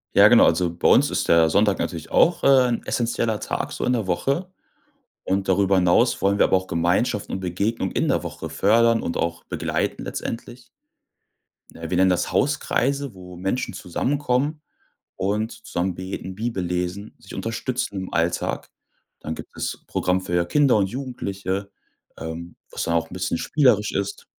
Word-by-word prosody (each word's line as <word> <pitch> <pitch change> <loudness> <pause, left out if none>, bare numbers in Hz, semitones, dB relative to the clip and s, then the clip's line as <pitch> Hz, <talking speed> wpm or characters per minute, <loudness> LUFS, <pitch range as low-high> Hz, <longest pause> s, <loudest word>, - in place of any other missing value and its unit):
Ja, - - +8
genau, - - +7
also 85 0 +2
bei 85 - 0
uns - - +5
ist - - -1
der 80 -1 +5
Sonntag 100 +2 +2
natürlich 80 -3 -4
auch, 175 - +3
äh, - - +4 0.2
'n 120 - -1
essenzieller 115 -2 -1
Tag - - -3
so - - -4
in 125 - +2
der 110 -5 -1
Woche, 140 - -1 0.8
und 95 0 0
darüber 95 +1 +3
hinaus 95 +7 +3
wollen 100 +1 +2
wir - - +5
aber - - +3
auch 95 0 -3
Gemeinschaften 90 +6 0
und - - -3
Begegnungen 95 +3 -2
in - - 0
der - - +1
Woche 80 - -6
fördern 115 +7 +3
und 85 - -3
auch 85 0 -2
begleiten - - -2
letztendlich. 120 +1 -6 1.1
Ne, 80 -1 -7
wir 90 - 0
nennen 95 0 +5
das 90 -1 0
Hauskreise, 140 -1 0
wo 90 -1 -11
Menschen 95 +8 -2
zusammenkommen 140 - -1 0.5
und 105 +4 -1
zusammen 90 -4 -3
beten, 95 0 -6
Bibel 110 -3 -2
lesen, 90 +4 -3
sich 95 - -13
unterstützen 120 +1 -3
im 95 - -7
Alltag. 85 +1 -1 0.5
Dann 80 +1 -4
gibt - - -11
es - - -4
Programm 90 0 0
für 85 -1 0
Kinder 140 +4 +3
und 100 -2 +2
Jugendliche, 100 -6 -4 0.5
ähm, 80 +1 -7 0.2
was - - -3
dann 85 - -1
auch 80 -1 0
'n - - -11
bisschen 90 -2 -2
spielerisch 125 -9 +2
ist. 100 0 -3
95 Hz, 170 wpm, -23 LUFS, 90-115 Hz, 1.1 s, Ja